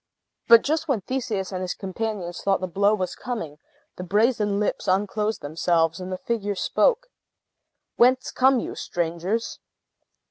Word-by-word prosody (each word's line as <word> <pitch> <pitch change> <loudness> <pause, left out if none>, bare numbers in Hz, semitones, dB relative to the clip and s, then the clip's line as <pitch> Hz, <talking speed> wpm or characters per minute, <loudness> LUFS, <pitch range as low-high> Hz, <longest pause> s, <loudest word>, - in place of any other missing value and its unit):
But 230 -1 +8
just 315 +2 -1
when 260 -8 0
Theseus 215 -5 -3
and 185 -1 -4
his 185 -1 -3
companions 195 -2 -4
thought 195 -1 +1
the 185 - -2
blow 200 +4 +2
was 185 -3 -3
coming, 165 -12 -6 0.4
the 180 - -5
brazen 210 +1 +1
lips 210 - -2
unclosed 210 +3 0
themselves, 165 +2 0
and 185 0 -6
the 185 - -2
figure 205 -1 -2
spoke. 480 - +2 0.9
"Whence 255 +2 +3
come 260 0 +4
you, - - -5
strangers?" 175 +6 -3
200 Hz, 145 wpm, -24 LUFS, 180-230 Hz, 0.9 s, But